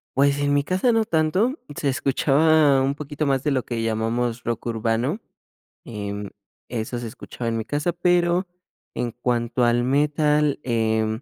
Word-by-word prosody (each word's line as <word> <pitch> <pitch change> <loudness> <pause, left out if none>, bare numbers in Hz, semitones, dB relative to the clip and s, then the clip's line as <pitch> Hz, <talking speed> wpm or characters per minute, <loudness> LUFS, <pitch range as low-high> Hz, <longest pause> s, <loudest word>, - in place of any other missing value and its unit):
Pues, 140 +1 +3
en 145 0 +1
mi 145 0 +2
casa 185 - +1
no 225 -1 +2
tanto, 185 - +1 0.2
se 140 - -1
escuchaba 140 +1 +3
un 135 +1 0
poquito 145 0 -4
más 135 -1 +1
de 150 - +1
lo 130 -2 0
que 115 -2 -3
llamamos 115 +2 -1
rock 120 0 -3
urbano, 115 - -1 0.7
em, 100 -2 -5 0.4
eso 120 0 -3
se 120 - -6
escuchaba 115 +1 -6
en 115 - -1
mi 110 - -3
casa, 150 +4 -1
pero 175 +1 +2 0.5
en 120 -1 -2
cuanto 120 0 -1
al 120 +1 +2
metal, 150 +2 +2
em, 110 -1 0
135 Hz, 160 wpm, -23 LUFS, 115-150 Hz, 0.7 s, Pues